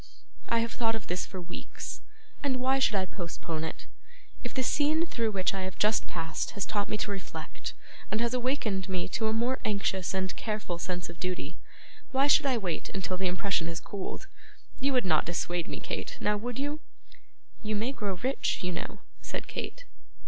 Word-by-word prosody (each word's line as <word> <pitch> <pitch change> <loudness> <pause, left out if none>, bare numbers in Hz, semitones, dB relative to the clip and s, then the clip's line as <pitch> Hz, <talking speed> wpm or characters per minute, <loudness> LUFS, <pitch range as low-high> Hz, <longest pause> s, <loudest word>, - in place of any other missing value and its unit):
'I 230 0 +4
have 230 0 0
thought 225 -2 +2
of 220 - -4
this 180 +1 -1
for 190 - -5
weeks, 175 0 -6 0.4
and 265 -3 +2
why 265 +1 +4
should 265 - +4
I 190 -1 +3
postpone 170 -3 -3
it? 160 - -4 0.6
If - - -2
the 260 - +1
scene 305 +5 +4
through 230 -9 +1
which 195 -3 +2
I 195 - -1
have 185 -2 -3
just 215 +1 +4
passed 165 -2 -2
has 200 - +1
taught 205 -1 0
me 215 - +1
to 210 - -1
reflect, 195 -1 -5 0.3
and 215 - +1
has 235 +1 +2
awakened 240 -7 +1
me 185 -2 +1
to 220 - +1
a - - +3
more 240 +4 +2
anxious 195 -2 +1
and 185 -1 0
careful 210 -6 -2
sense 180 -1 -1
of 170 -1 -9
duty, 180 -3 -2 0.5
why 270 +1 +4
should 285 0 +7
I 260 -3 +4
wait 185 -7 -1
until 190 -1 0
the 185 +1 +1
impression 180 -2 +1
has 170 0 -2
cooled? 200 - -4 0.5
You 275 +1 +3
would 250 -4 +4
not 160 -4 +4
dissuade 175 0 0
me, - - -3
Kate; - - -3
now 210 - +3
would 235 +3 -2
you?' 290 +2 0 0.8
'You 215 -1 0
may 225 +5 +1
grow 205 -7 -1
rich, 265 -5 +2
you 180 - +1
know,' 170 - -4 0.2
said - - -3
Kate. - - -4
205 Hz, 195 wpm, -31 LUFS, 180-245 Hz, 0.8 s, should